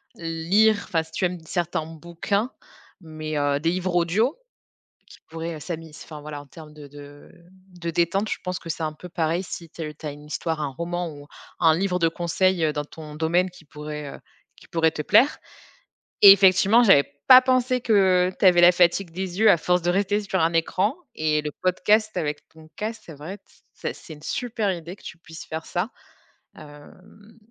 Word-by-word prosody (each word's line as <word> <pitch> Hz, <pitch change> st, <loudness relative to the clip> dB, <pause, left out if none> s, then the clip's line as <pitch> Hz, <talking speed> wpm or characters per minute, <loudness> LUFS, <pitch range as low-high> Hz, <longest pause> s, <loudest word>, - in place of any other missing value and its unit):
lire, 175 Hz, +5 st, +2 dB
enfin 165 Hz, -2 st, -1 dB
si 160 Hz, -, -19 dB
tu 185 Hz, -, -1 dB
aimes 180 Hz, 0 st, -2 dB
certains 170 Hz, -2 st, -2 dB
bouquins, 170 Hz, -, -3 dB, 0.5 s
mais, 155 Hz, -2 st, -6 dB
heu, 145 Hz, 0 st, +1 dB
des 165 Hz, +2 st, 0 dB
livres 185 Hz, 0 st, -2 dB
audio 195 Hz, -, +1 dB, 0.7 s
qui -, -, -16 dB
pourraient, 165 Hz, 0 st, -5 dB
heu, -, -, -10 dB
s'ami 165 Hz, 0 st, -7 dB
s 150 Hz, -, -12 dB
enfin 150 Hz, -2 st, -10 dB
voilà 150 Hz, -1 st, -7 dB
en 145 Hz, -, -13 dB
termes 150 Hz, +2 st, -13 dB
de 150 Hz, -1 st, -12 dB
de 145 Hz, 0 st, -14 dB, 0.5 s
de 170 Hz, 0 st, -3 dB
détente, 175 Hz, +5 st, 0 dB
je -, -, -2 dB
pense 180 Hz, 0 st, -3 dB
que 165 Hz, -, -11 dB
c'est 160 Hz, -, -4 dB
un 155 Hz, -, -2 dB
peu 180 Hz, +4 st, -11 dB
pareil 165 Hz, +1 st, -1 dB
si 170 Hz, -2 st, -8 dB
tu 165 Hz, -, -9 dB
as -, -, -3 dB
heu, 150 Hz, -, -6 dB
tu 155 Hz, -, -9 dB
as 145 Hz, -, -3 dB
une 145 Hz, +1 st, -13 dB
histoire, 160 Hz, +1 st, -3 dB
un 145 Hz, -, -1 dB
roman 170 Hz, +4 st, -4 dB
ou 145 Hz, 0 st, -12 dB, 0.3 s
un 160 Hz, -2 st, +4 dB
livre 180 Hz, 0 st, 0 dB
de 165 Hz, -1 st, +3 dB
conseils, 175 Hz, +1 st, 0 dB
heu, 155 Hz, -, +1 dB
dans 150 Hz, 0 st, -3 dB
ton 150 Hz, 0 st, -11 dB
domaine 170 Hz, +4 st, +1 dB
qui 175 Hz, -2 st, -17 dB
pourrait, 150 Hz, -1 st, -8 dB
heu, -, -, -12 dB, 0.4 s
qui -, -, -19 dB
pourrait 160 Hz, -1 st, +2 dB
te 150 Hz, -, -4 dB
plaire. 260 Hz, -, +4 dB, 0.9 s
Et 200 Hz, -, +12 dB
effectivement, 200 Hz, +4 st, +5 dB
j'avais 190 Hz, -10 st, +6 dB, 0.2 s
pas 255 Hz, -1 st, +10 dB
pensé 255 Hz, -1 st, +1 dB
que 190 Hz, -5 st, +3 dB
tu -, -, +2 dB
avais 175 Hz, -1 st, +6 dB
la 175 Hz, +1 st, +8 dB
fatigue 175 Hz, 0 st, +2 dB
des 185 Hz, +1 st, -5 dB
yeux 220 Hz, -1 st, +6 dB
à 175 Hz, -, +6 dB
force 180 Hz, +2 st, +1 dB
de 175 Hz, -, -1 dB
rester 200 Hz, +3 st, +1 dB
sur 195 Hz, -2 st, -2 dB
un 165 Hz, +1 st, +2 dB
écran 185 Hz, -, 0 dB, 0.2 s
et 155 Hz, -1 st, 0 dB
le 150 Hz, 0 st, -5 dB
podcast 210 Hz, +4 st, +2 dB
avec 150 Hz, -3 st, -3 dB
ton 160 Hz, 0 st, -17 dB
casque, 220 Hz, +2 st, -5 dB
c'est 165 Hz, -, -10 dB
vrai, 160 Hz, +8 st, -8 dB
t -, -, -40 dB, 0.3 s
c'est -, -, -5 dB
c'est 160 Hz, -, -12 dB
une 150 Hz, -, -14 dB
super 225 Hz, -3 st, -2 dB
idée 170 Hz, +1 st, -7 dB
que -, -, -23 dB
tu 175 Hz, -, -9 dB
puisses 165 Hz, -1 st, -11 dB
faire 160 Hz, +1 st, -6 dB
ça, 180 Hz, +5 st, -2 dB, 0.7 s
hem, 185 Hz, +9 st, -16 dB
170 Hz, 210 wpm, -24 LUFS, 155-190 Hz, 0.9 s, Et